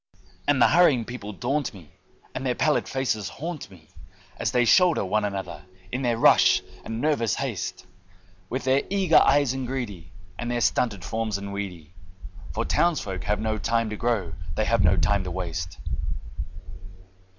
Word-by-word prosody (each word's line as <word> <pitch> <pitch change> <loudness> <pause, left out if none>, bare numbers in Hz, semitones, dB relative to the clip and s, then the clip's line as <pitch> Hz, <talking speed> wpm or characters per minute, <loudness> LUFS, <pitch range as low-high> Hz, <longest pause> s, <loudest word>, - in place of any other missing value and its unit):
And 145 -2 +3
the - - +6
hurrying 150 -9 +4
people 115 -4 -7
daunt 130 +4 -2
me, 80 -6 -14 0.4
and 130 - -4
their 125 -2 0
pallid 155 - +1
faces 110 -7 -1
haunt 160 -5 -6
me 85 -5 -17 0.5
As - - -1
they 125 -1 +3
shoulder 175 - +4
one 105 +3 +1
another 100 -3 -4 0.3
in 125 - -2
their 120 -3 +1
rush - - +5 0.2
and 115 0 -5
nervous 120 -8 +1
haste, - - -4 0.6
With 130 +2 -3
their 130 +1 +3
eager 190 -4 +4
eyes 140 -2 +4
and 130 -1 -4
greedy, 105 -11 -5 0.3
and 120 - -3
their 120 0 -1
stunted 100 +1 +1
forms 110 -2 -2
and 100 0 -6
weedy, 90 -5 -6 0.6
For - - -2
townsfolk 120 - 0
have 105 0 0
no 110 0 -1
time 115 +1 0
to - - -3
grow, 105 -7 -1 0.2
they - - +1
have - - +2
no - - +4
time 100 -2 +2
to 90 - -4
waste. 85 -3 -4
115 Hz, 165 wpm, -25 LUFS, 100-130 Hz, 0.6 s, the